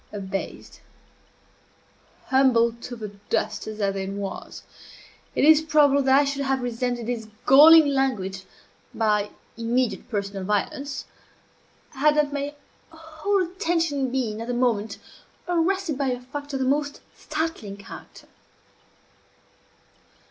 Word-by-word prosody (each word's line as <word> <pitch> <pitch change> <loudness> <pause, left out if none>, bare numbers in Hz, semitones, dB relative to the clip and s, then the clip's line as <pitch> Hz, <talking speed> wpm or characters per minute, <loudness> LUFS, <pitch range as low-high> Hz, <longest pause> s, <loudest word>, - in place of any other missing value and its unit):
Abased, 195 -1 -6 1.5
humbled 235 -3 +3
to 245 - -7
the 215 -3 -6 0.2
dust - - -1
as 215 0 -7
I 200 -1 +1
then 195 0 -4
was, 200 -1 -6 0.7
it - - +3
is 315 0 +7
probable 295 -3 +4
that 265 0 +4
I - - +4
should 280 0 -2
have 270 -2 0
resented 245 0 -2
this 230 -2 -4 0.2
galling 310 +4 +9
language 205 -9 -1 0.5
by 210 -2 +1 0.3
immediate 240 +2 -1
personal 200 -3 -3
violence, 210 +8 -2 0.9
had 295 +2 +2
not 295 -1 +1
my 285 +1 -3 0.3
whole 320 +5 -2
attention 330 -7 -1
been 230 -5 -2
at 230 - -6
the 245 - -2
moment 225 -4 0 0.5
arrested 350 -2 0
by 275 - 0
a 250 -1 -1
fact 285 +3 -8
of 270 - -1
the - - +1
most 285 +2 -1
startling 305 -11 -4
character. 200 - -12
260 Hz, 125 wpm, -24 LUFS, 220-295 Hz, 1.5 s, galling